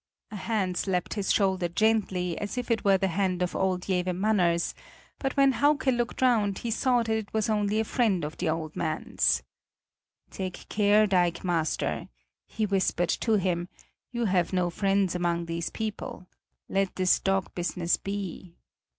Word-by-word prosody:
A -, -, -6 dB
hand 195 Hz, -3 st, -1 dB
slapped 180 Hz, -2 st, -1 dB
his 205 Hz, -2 st, -1 dB
shoulder 190 Hz, -3 st, +2 dB
gently, 185 Hz, -2 st, +1 dB
as 205 Hz, +4 st, -4 dB
if 245 Hz, -1 st, -2 dB
it 225 Hz, -, +1 dB
were 195 Hz, -1 st, +5 dB
the 195 Hz, 0 st, 0 dB
hand 185 Hz, 0 st, 0 dB
of 180 Hz, -, -3 dB
old 185 Hz, -1 st, 0 dB
Jewe 185 Hz, -2 st, +1 dB
Manners, 180 Hz, -3 st, +1 dB, 0.5 s
but 270 Hz, +1 st, -2 dB
when 275 Hz, -1 st, +6 dB
Hauke 285 Hz, +2 st, +2 dB
looked 240 Hz, +2 st, -2 dB
round, 215 Hz, -6 st, +3 dB
he 235 Hz, -, -4 dB
saw 245 Hz, +1 st, +2 dB
that 225 Hz, -, -6 dB
it 220 Hz, -2 st, -1 dB
was 220 Hz, 0 st, +1 dB
only 210 Hz, 0 st, +1 dB
a -, -, +2 dB
friend 210 Hz, -9 st, +1 dB
of 150 Hz, -, -6 dB
the 170 Hz, -, -1 dB
old 155 Hz, -1 st, -3 dB
man's. 155 Hz, -1 st, 0 dB, 0.9 s
"Take 185 Hz, -2 st, -6 dB
care, 210 Hz, 0 st, +4 dB
dikemaster!" 175 Hz, -3 st, 0 dB, 0.4 s
he 220 Hz, -, -2 dB
whispered 190 Hz, -3 st, +1 dB
to 225 Hz, -, +1 dB
him. 180 Hz, -2 st, -1 dB, 0.4 s
"You 240 Hz, -1 st, -1 dB
have 185 Hz, -4 st, +1 dB
no 180 Hz, -1 st, +1 dB
friends 195 Hz, 0 st, +1 dB
among 170 Hz, -1 st, 0 dB
these 170 Hz, 0 st, -3 dB
people; 215 Hz, -4 st, -5 dB, 0.4 s
let 195 Hz, -1 st, 0 dB
this 185 Hz, -1 st, +3 dB
dog 195 Hz, -1 st, 0 dB
business 175 Hz, -1 st, 0 dB
be!" 195 Hz, -3 st, -6 dB
195 Hz, 165 wpm, -27 LUFS, 180-215 Hz, 0.9 s, when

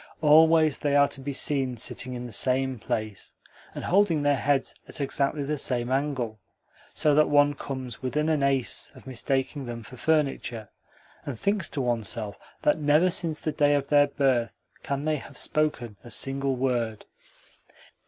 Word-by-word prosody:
Always 155 Hz, 0 st, +5 dB
they 145 Hz, -1 st, 0 dB
are 140 Hz, 0 st, +6 dB
to 135 Hz, -, -5 dB
be 140 Hz, +2 st, -4 dB
seen 135 Hz, -3 st, 0 dB
sitting 125 Hz, +3 st, -3 dB
in 125 Hz, 0 st, -6 dB
the 120 Hz, -, -8 dB
same 130 Hz, +2 st, +1 dB
place, 110 Hz, -2 st, -4 dB, 0.4 s
and -, -, -5 dB
holding 180 Hz, -5 st, +2 dB
their 145 Hz, 0 st, +3 dB
heads 140 Hz, +2 st, 0 dB
at -, -, -6 dB
exactly 140 Hz, +1 st, -1 dB
the 150 Hz, +1 st, -2 dB
same 125 Hz, -2 st, -1 dB
angle, 130 Hz, -6 st, -1 dB, 0.5 s
so 150 Hz, -, +2 dB
that 155 Hz, +1 st, +4 dB
one 145 Hz, 0 st, +4 dB
comes 130 Hz, -4 st, -6 dB
within 150 Hz, +4 st, -1 dB
an 155 Hz, -3 st, +1 dB
ace 135 Hz, -2 st, 0 dB
of -, -, -15 dB
mistaking 130 Hz, +1 st, -2 dB
them 120 Hz, -1 st, -6 dB
for 125 Hz, +4 st, -12 dB
furniture, 135 Hz, -7 st, -1 dB, 0.5 s
and 135 Hz, -5 st, -5 dB
thinks 200 Hz, -, 0 dB
to 140 Hz, -, -3 dB
oneself 115 Hz, -3 st, -1 dB, 0.2 s
that 150 Hz, -, +3 dB
never 155 Hz, +5 st, +3 dB
since 165 Hz, -3 st, -1 dB
the 155 Hz, -, -2 dB
day 145 Hz, 0 st, +3 dB
of 140 Hz, -1 st, -2 dB
their 145 Hz, -1 st, +5 dB
birth 130 Hz, -5 st, 0 dB, 0.3 s
can 140 Hz, +1 st, -3 dB
they 155 Hz, -1 st, +1 dB
have -, -, -10 dB
spoken 145 Hz, -8 st, -1 dB
a 120 Hz, -, -11 dB
single 135 Hz, +3 st, -1 dB
word. 120 Hz, -4 st, -1 dB
140 Hz, 170 wpm, -26 LUFS, 125-150 Hz, 0.5 s, are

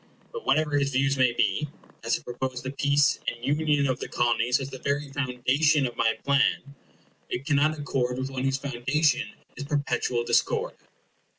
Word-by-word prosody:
But 475 Hz, -2 st, -8 dB
whatever 150 Hz, -2 st, +2 dB
his 140 Hz, 0 st, +1 dB
views 135 Hz, +1 st, +2 dB
may 130 Hz, -2 st, +3 dB
be, 150 Hz, +4 st, 0 dB, 0.3 s
as 115 Hz, 0 st, +1 dB
I -, -, -15 dB
propose 125 Hz, +1 st, -4 dB
the 130 Hz, -, -4 dB
peace 140 Hz, +1 st, +2 dB
and 120 Hz, +1 st, -3 dB
union 150 Hz, -3 st, +2 dB
of 130 Hz, -2 st, 0 dB
the -, -, -5 dB
Colonies 120 Hz, +1 st, +1 dB
as 135 Hz, 0 st, -6 dB
the 130 Hz, -, -8 dB
very 140 Hz, +1 st, -2 dB
foundation 140 Hz, +2 st, +1 dB
of 120 Hz, -, -4 dB
my 115 Hz, -1 st, +2 dB
plan, 140 Hz, 0 st, +1 dB, 0.6 s
it 125 Hz, -, -4 dB
cannot 155 Hz, +1 st, +2 dB
accord 125 Hz, -4 st, -1 dB
with 130 Hz, +1 st, -3 dB
one 130 Hz, -1 st, -3 dB
whose 135 Hz, 0 st, +1 dB
foundation 140 Hz, +2 st, 0 dB, 0.3 s
is 140 Hz, -, -5 dB
perpetual 140 Hz, -4 st, -1 dB
discord. -, -, +1 dB
135 Hz, 175 wpm, -26 LUFS, 125-145 Hz, 0.6 s, may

